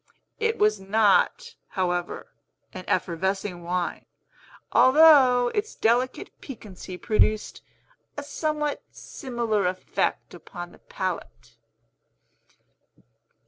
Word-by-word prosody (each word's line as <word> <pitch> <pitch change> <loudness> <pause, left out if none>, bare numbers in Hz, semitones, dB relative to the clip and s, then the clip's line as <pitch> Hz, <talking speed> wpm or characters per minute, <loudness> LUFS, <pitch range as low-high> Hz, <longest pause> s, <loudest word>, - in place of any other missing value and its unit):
It 455 0 0
was 210 -1 +2
not, 215 - +2
however, 175 -3 -3 0.4
an 185 -3 -8
effervescing 185 +1 -1
wine, 175 +1 -3 0.6
although 260 -4 +6
its 415 +1 -2
delicate 245 +3 0
piquancy 195 -8 -9
produced 215 +1 0 0.6
a 290 - -4
somewhat 300 0 -2
similar 235 - -3
effect 185 +1 -2
upon 175 -2 -9
the - - -18
palate. 120 - -6
210 Hz, 85 wpm, -25 LUFS, 185-260 Hz, 0.6 s, although